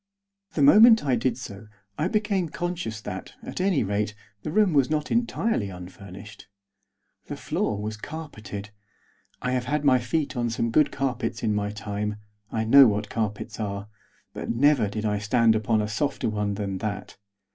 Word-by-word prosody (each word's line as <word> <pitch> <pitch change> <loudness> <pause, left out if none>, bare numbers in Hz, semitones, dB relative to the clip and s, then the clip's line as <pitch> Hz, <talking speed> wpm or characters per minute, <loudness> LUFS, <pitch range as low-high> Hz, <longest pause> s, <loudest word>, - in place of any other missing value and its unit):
The 145 - +2
moment 220 - +8
I 130 -3 +3
did 120 0 0
so 110 -4 -9 0.3
I 155 - 0
became 205 -4 0
conscious 170 -11 -4
that, 95 -2 -7
at - - -5
any 190 -6 +2
rate, 105 +1 -1 0.3
the - - -5
room 205 -1 +3
was 140 -3 +3
not 150 -1 -1
entirely 230 - 0
unfurnished. 95 +3 -11 0.8
The - - -5
floor 105 - -2
was 105 +1 -4
carpeted. 110 -8 -7 0.7
I 125 - 0
have 125 -1 0
had 150 0 -1
my 130 -2 +5
feet 140 +6 -2
on 120 -1 0
some 115 0 -1
good 150 +5 +4
carpets 130 -4 -2
in 110 -2 +1
my 105 0 -1
time; 105 0 -4 0.4
I 110 - -1
know 135 +4 +8
what 105 -1 -1
carpets 110 -3 -3
are; 100 -1 -4 0.4
but - - -6
never 135 -3 +3
did 110 +1 -4
I 105 -1 0
stand 110 +2 +3
upon 110 0 +1
a - - -2
softer 110 +4 -1
one 105 -1 -1
than 100 -2 -3
that. 105 0 -5
110 Hz, 170 wpm, -25 LUFS, 105-145 Hz, 0.8 s, moment